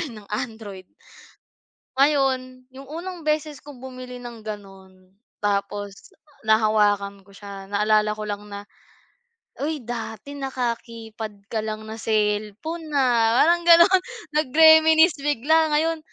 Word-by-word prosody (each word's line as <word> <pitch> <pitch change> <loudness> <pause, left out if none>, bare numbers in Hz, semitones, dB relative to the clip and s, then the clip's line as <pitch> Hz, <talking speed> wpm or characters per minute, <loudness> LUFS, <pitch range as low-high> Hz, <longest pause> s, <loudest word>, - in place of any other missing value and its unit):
line 230 -11 -7
ang - - -25 0.2
Android. 205 -4 -11 1.1
Ngayon 260 -3 +1
yung 270 - -10
unang 340 +1 -7
beses 305 -1 -2
kong 285 -4 -12
bumili 255 -1 -9
ng 235 -3 -10
ganun. 190 -3 -11 0.3
Tapos 205 0 -3 0.3
nahawakan 210 -2 +2
ko 200 - -21
siya 200 -1 -10
naalala 210 +1 +2
ko 215 - -7
lang 205 0 -4
na, 200 0 -8 0.9
"Uy, 295 -3 -3
dati 230 +2 -6
naka-keypad 230 -5 -5
ka 220 - 0
lang 215 0 -5
na 220 +1 -8
cellphone, 215 +10 -2
ah." 240 -3 +3
Parang 345 +2 +3
ganon 340 +2 +8 0.4
nag-reminisce 315 +2 +5
bigla 300 +3 +2
ngayon 325 +1 +1
230 Hz, 120 wpm, -23 LUFS, 210-295 Hz, 1.1 s, ganon